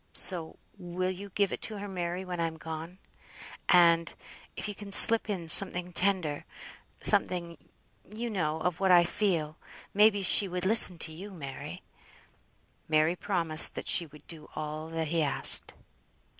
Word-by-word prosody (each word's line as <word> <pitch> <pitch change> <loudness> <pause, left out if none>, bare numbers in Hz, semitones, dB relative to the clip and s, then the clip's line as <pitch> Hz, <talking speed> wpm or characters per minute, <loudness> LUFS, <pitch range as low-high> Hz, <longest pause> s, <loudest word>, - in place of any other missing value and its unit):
So, 170 -4 +2 0.2
will 180 +1 -5
you 200 +2 -10
give 200 +1 -2
it - - -8
to 215 - -5
her, 205 0 -8
Mary, 180 -1 -6
when 180 -1 -7
I'm 165 -1 -4
gone? 160 +3 -10 0.7
and, 170 -2 +3 0.4
if - - -6
you 210 - -6
can 205 0 -12
slip 225 +2 +8
in 180 -5 -5
something 180 +1 +2
tender, 180 -6 +1 0.6
something, 170 -2 +1 0.5
you 225 +3 -7
know, 160 -8 -4
of 180 -1 -4
what 195 -1 -1
I 175 -1 +5
feel, 170 -5 -3 0.4
may 210 +2 +4
be 205 -2 -6
she 195 +2 +3
would 180 0 -6
listen 190 -3 +5
to 160 - -2
you, 185 +6 -11
Mary." 140 -8 -10 1.1
Mary 155 +2 0
promised 165 -5 0
that - - -8
she 170 - -1
would 150 0 -19
do 155 -2 -12
all 155 +1 -7
that 165 -1 -5
he 165 0 -2
asked. 140 -3 +1
175 Hz, 160 wpm, -27 LUFS, 160-195 Hz, 1.1 s, slip